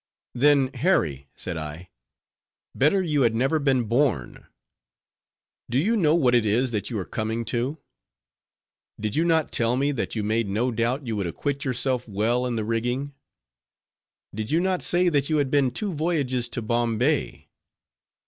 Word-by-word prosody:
"Then, 135 0 +3
Harry," 85 - 0
said 90 -2 -4
I, 80 +4 -7 0.8
"better 170 +8 +3
you 150 -5 +1
had 115 -3 +3
never 135 +7 +1
been 135 -4 +2
born. 115 - -1 1.2
Do 120 - 0
you 205 +12 +2
know 160 -7 +3
what 130 -7 +3
it 120 -2 +4
is 115 +4 +1
that 105 -3 -3
you 115 - -3
are 95 - -3
coming 110 +1 -3
to? 125 +6 -1 1.2
Did 105 -1 -3
you 160 - +2
not 165 -2 +1
tell 120 +1 +1
me 140 +2 +1
that 130 -4 -3
you 110 - -1
made 110 0 0
no 115 +6 0
doubt 120 +5 -1
you 115 -2 -2
would 100 -3 -1
acquit 140 - -3
yourself 125 -1 -1
well 115 +5 0
in 120 - -2
the 110 -2 -2
rigging? 120 +5 -2 1.2
Did 110 +1 -4
you 160 - +2
not 185 0 0
say 180 +1 +2
that 145 -3 +1
you 155 - +2
had 140 -2 0
been 140 -3 +3
two 195 - -3
voyages 145 -7 -1
to 120 - -4
Bombay? 115 0 0
125 Hz, 165 wpm, -25 LUFS, 115-145 Hz, 1.2 s, it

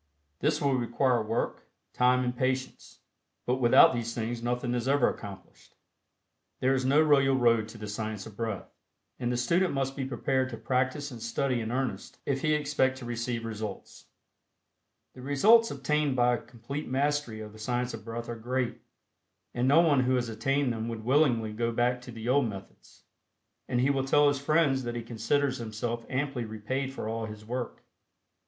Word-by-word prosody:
This - - +1
will 140 -2 +1
require 125 0 +1
work, 110 +2 -2 0.3
time 125 +1 +3
and 125 0 -2
patience, 130 +1 -3 0.4
but 125 +1 +1
without 120 +1 +7
these 115 -1 -3
things 115 0 -3
nothing 120 +1 -1
is 120 0 -2
ever 140 -2 +4
accomplished. 100 -3 -8 0.8
There 130 +1 +2
is 130 -1 0
no 135 +4 +4
royal 135 -3 +4
road 115 -4 +3
to 115 - -11
the 105 -1 -7
Science 105 -1 -4
of 110 - -11
Breath, 110 -3 -4 0.5
and 120 -1 -1
the 125 - 0
student 170 +7 +1
must 135 0 -1
be 135 - -3
prepared 130 0 0
to 115 - -6
practice 130 +5 -1
and 120 -2 -9
study 125 +1 -1
in 110 0 -4
earnest 125 -6 -3
if 135 -1 -1
he 155 -1 +2
expect 140 -3 +1
to 130 - -8
receive 120 0 -3
results. 110 -1 -7 1.1
The 130 - -11
results 210 - +5
obtained 150 -3 0
by 125 -1 +3
a 120 - -2
complete 130 +5 -7
mastery 140 -3 0
of 105 -1 -8
the 110 - -13
Science 125 +2 -2
of 115 - -7
Breath 115 +1 -6
are 120 - -4
great, 125 +2 -2 0.7
and 120 +1 0
no 145 +5 +6
one 150 -5 +4
who 130 0 +2
has 120 -2 -1
attained 135 +3 0
them 110 0 -4
would 115 -1 -5
willingly 125 -5 +2
go 115 +2 -1
back 125 +1 +1
to 125 - -10
the 115 0 -7
old 130 -1 +3
methods, 100 -2 -12 0.6
and 120 - 0
he 130 +3 +3
will 135 -1 0
tell 145 +1 +5
his 140 -1 -1
friends 145 -3 +2
that 120 -1 -4
he 120 - -4
considers 125 +4 0
himself 115 +1 -4
amply 135 -2 -1
repaid 115 +5 -3
for 135 - -5
all 110 0 -3
his 105 0 -10
work. 125 +1 -5
125 Hz, 185 wpm, -29 LUFS, 115-135 Hz, 1.1 s, without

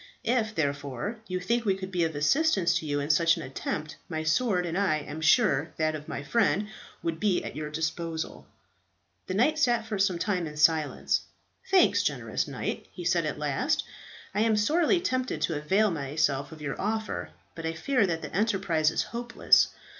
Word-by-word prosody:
If, 225 -3 0
therefore, 140 - -2
you 185 0 -2
think 235 +6 0
we 195 -4 +2
could 190 0 -7
be 180 -2 +1
of 160 -2 -3
assistance 190 - +2
to 160 - -7
you 145 0 0
in 145 +2 +1
such 165 +2 +4
an - - -5
attempt, 150 +3 -4
my 160 -2 -3
sword, 180 +3 +1
and 170 0 -3
I 190 -5 +2
am 150 +1 -7
sure 160 - +3
that 155 0 +1
of 150 -1 -7
my 140 - -5
friend, 210 +4 +1 0.3
would 165 -1 -2
be 195 -2 +1
at - - -6
your 150 0 -4
disposal." 160 +1 -4 0.8
The 185 - -2
knight 305 +9 +3
sat 240 -6 +2
for 215 -3 -3
some 190 -2 +2
time 180 -2 -1
in 150 0 -9
silence. 155 -1 +2 0.5
"Thanks, 380 -1 +5
generous - - -1
knight," - - -4
he - - -8
said - - +2
at - - -3
last, - - 0 0.5
"I 205 - +1
am 220 -1 +3
sorely 325 - +3
tempted 255 -7 -1
to 165 - 0
avail 190 +8 +2
myself 145 -2 -1
of 155 -1 -10
your 140 -2 -4
offer; 220 +1 -2 0.2
but 165 -1 -5
I 165 - -2
fear 220 +6 +1
that 165 -2 -2
the - - -6
enterprise 190 -7 +2
is - - 0
hopeless. 240 +1 +3
170 Hz, 190 wpm, -28 LUFS, 155-215 Hz, 0.8 s, Thanks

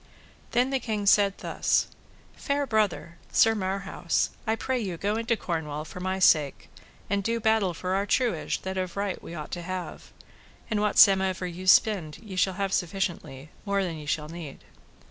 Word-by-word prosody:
Then 250 +3 +1
the 270 - +1
king 215 -4 -3
said 200 -1 +4
thus: - - +1 0.5
Fair 285 0 -1
brother, 210 -7 -1
Sir 225 - +5
Marhaus, 190 -3 -1 0.2
I 220 - +2
pray 255 +3 -2
you 190 -7 -4
go 205 +5 -1
into 230 0 0
Cornwall 155 -5 -4
for 180 - -9
my 185 +1 -2
sake, 155 -6 +3 0.4
and 200 -1 0
do 230 +3 0
battle 220 -5 +2
for 185 +3 -3
our 200 +1 0
truage 230 -11 0
that 190 0 -3
of 185 0 -4
right 200 -2 -2
we 170 - -9
ought 155 -2 -7
to 175 - -4
have; 185 +1 -6 0.6
and 210 -1 +1
whatsomever 190 -3 +4
ye 180 +1 -6
spend 185 -6 +4
ye 205 -4 -10
shall 185 0 +1
have 195 -1 -2
sufficiently, 165 -6 -3
more 200 -1 0
than 170 -3 -4
ye 150 - -9
shall 150 0 -1
need. 165 -4 -9
190 Hz, 175 wpm, -27 LUFS, 170-210 Hz, 0.6 s, Sir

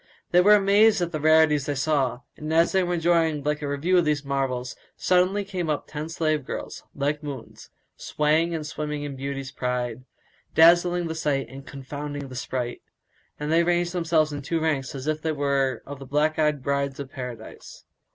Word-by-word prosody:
They 180 - +6
were 210 +3 +7
amazed 205 +2 +5
at 170 - -3
the 155 - -3
rarities 155 -1 +4
they 145 - -1
saw; 135 -3 0
and, 155 0 -6
as 165 +1 +4
they 190 - +3
were 175 -1 0
enjoying 165 -3 +1
a 150 -1 -1
review 160 +6 +2
of 170 - +1
these 150 -2 0
marvels, 130 -2 -2 0.2
suddenly 185 +3 +2
up - - -17
came 180 -5 -2
ten 155 +1 -6
slave 155 -3 0
girls, - - -6
like 145 +1 -1
moons, 140 -6 -8 0.3
swaying 155 +3 +1
and 155 -2 -4
swimming 150 -1 -4
in 145 -2 -5
beauty's 135 0 -5
pride, 125 -1 -3 0.5
dazzling 175 +2 +5
the 160 - -3
sight 140 -6 -1
and 135 +2 -11
confounding 145 +1 -6
the 130 - -9
sprite; 125 -1 -4 0.6
and 150 +1 -3
they 165 +1 +5
ranged 175 0 +1
themselves 160 -3 +1
in 145 - -4
two 160 +4 -1
ranks 150 -3 -1
as 135 0 -6
if 155 0 -1
they 160 0 -1
were 140 -3 0
of 140 -1 -8
the 135 - -10
black 150 +3 +1
eyed 150 -3 +1
Brides 140 0 -1
of 135 -2 -7
Paradise. 125 -4 -9
150 Hz, 190 wpm, -25 LUFS, 140-165 Hz, 0.6 s, were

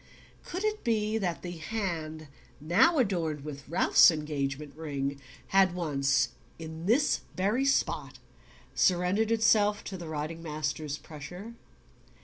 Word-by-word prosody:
Could 365 +3 -5
it 430 0 -1
be 220 -2 +1
that 180 -5 -2
the 175 -1 -6
hand 160 -5 -4 0.3
now 210 - +4
adorned 170 - 0
with 145 -2 -8
Ralph's 175 +2 +6
engagement 150 -2 -3
ring 140 -3 -4 0.3
had 190 -2 +4
once, 140 -6 +1 0.3
in 160 +1 -7
this 270 +7 +3 0.2
very 210 +8 +1
spot, 275 - 0 0.6
surrendered 185 +4 +2
itself 215 -2 +3
to 190 - -6
the 170 -2 -8
riding 155 +2 -4
master's 150 -2 -3
pressure? 180 +10 -9
170 Hz, 125 wpm, -29 LUFS, 150-210 Hz, 0.6 s, Ralph's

